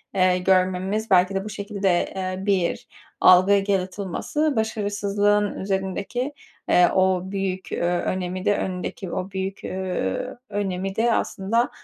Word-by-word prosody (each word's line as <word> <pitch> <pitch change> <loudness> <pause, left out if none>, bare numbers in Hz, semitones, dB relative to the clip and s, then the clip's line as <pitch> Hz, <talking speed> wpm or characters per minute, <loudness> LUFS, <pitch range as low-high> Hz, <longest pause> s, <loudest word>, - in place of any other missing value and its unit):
eee, 185 -1 +4
görmemiz, 185 +3 +1
belki 185 +1 +4
de 195 - -1
bu - - -5
şekilde, 200 -3 -1
ııı, 185 0 -3
bir 190 -4 0 0.3
algı 190 +2 +6
yaratılması, 200 - -1
başarısızlığın 205 -1 +1
üzerindeki, 195 +7 -2 0.4
ııı, 180 0 +6
o 185 0 +2
büyük, 190 -1 -3
ııı, - - -2 0.2
önemi 185 0 -3
de, 205 -1 +3
önündeki 185 0 -4
o 185 +1 -4
büyük, 190 0 -4
ııı, 185 - -3
önemi 195 -1 -2
de 230 +1 +2
aslında, 230 +6 0
190 Hz, 125 wpm, -23 LUFS, 185-205 Hz, 0.4 s, algı